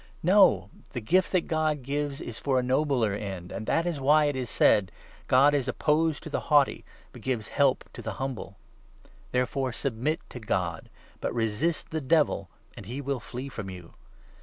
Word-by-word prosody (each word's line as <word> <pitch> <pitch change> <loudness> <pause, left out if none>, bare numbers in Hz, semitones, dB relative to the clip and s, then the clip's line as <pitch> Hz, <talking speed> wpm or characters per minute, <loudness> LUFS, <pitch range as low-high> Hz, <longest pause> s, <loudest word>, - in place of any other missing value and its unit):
' - - -28
No; 170 - +5 0.2
the - - -2
gift 180 +12 +2
that 185 - +3
God 155 -4 -1
gives 145 +1 -2
6 - - -7
is 120 - -5
for 135 -2 +1
a 125 - +2
nobler 130 -4 +1
end; 95 -3 -5
and 110 - -6
that 165 - +2
is 170 -5 -2
why 150 +3 +4
it 145 -1 0
is 125 -3 -3
said 95 -4 +3
— - - -22
' - - -25
God 140 +3 +5
is 135 -3 +1
opposed 150 +3 +1
to 160 - -7
the - - 0
haughty, 145 -2 +4 0.3
but - - -12
gives 120 -5 -2
help - - +2
to - - -8
the - - -4
humble.' 130 -7 -5 0.7
There 125 0 +2
7 - - -7
fore 135 -2 -1
submit 140 +5 -1
to 125 - -8
God; 90 -7 -2 0.3
but - - -3
resist 115 +9 -1
the 160 0 -2
Devil, 145 - +2 0.3
and 100 - -10
he 125 +5 -5
will 140 -2 -2
flee 125 +4 -7
from 115 -7 -6
you. 90 -3 -10
130 Hz, 210 wpm, -27 LUFS, 110-150 Hz, 0.7 s, No